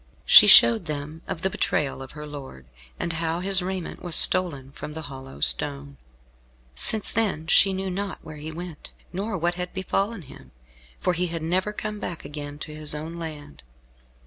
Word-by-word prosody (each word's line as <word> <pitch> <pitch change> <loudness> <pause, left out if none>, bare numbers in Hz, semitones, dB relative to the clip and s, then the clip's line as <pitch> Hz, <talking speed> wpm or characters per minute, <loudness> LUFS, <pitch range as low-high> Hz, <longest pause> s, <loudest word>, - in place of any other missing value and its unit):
She - - +9
showed 115 -1 +8
them 150 +2 -6
of 165 - -5
the 190 - +2
betrayal 140 -6 -1
of 135 - -10
her 150 0 -8
lord, 135 - -10 0.3
and 170 -1 -2
how 165 +1 -2
his 190 +1 +3
raiment 185 -1 -5
was 175 -3 +2
stolen 145 -8 +4
from 150 - -8
the 160 0 -7
hollow 135 - -10
stone. 70 -1 +1 0.8
Since 210 - +2
then 205 -8 -1
she 195 +4 +5
knew 190 0 -3
not 195 -1 -4
where 155 -1 -10
he 150 +2 -7
went, 165 -1 -9 0.2
nor 195 +2 -3
what 175 +1 0
had 180 +2 -6
befallen 195 +2 -2
him, - - -15 0.5
for 180 - 0
he 180 +1 -1
had 165 -1 -5
never 185 +5 0
come 210 0 -6
again 145 -3 -7
to 155 - -11
his 150 -1 -4
own 160 +3 -7
land. 150 -3 -9
160 Hz, 175 wpm, -24 LUFS, 145-185 Hz, 0.8 s, She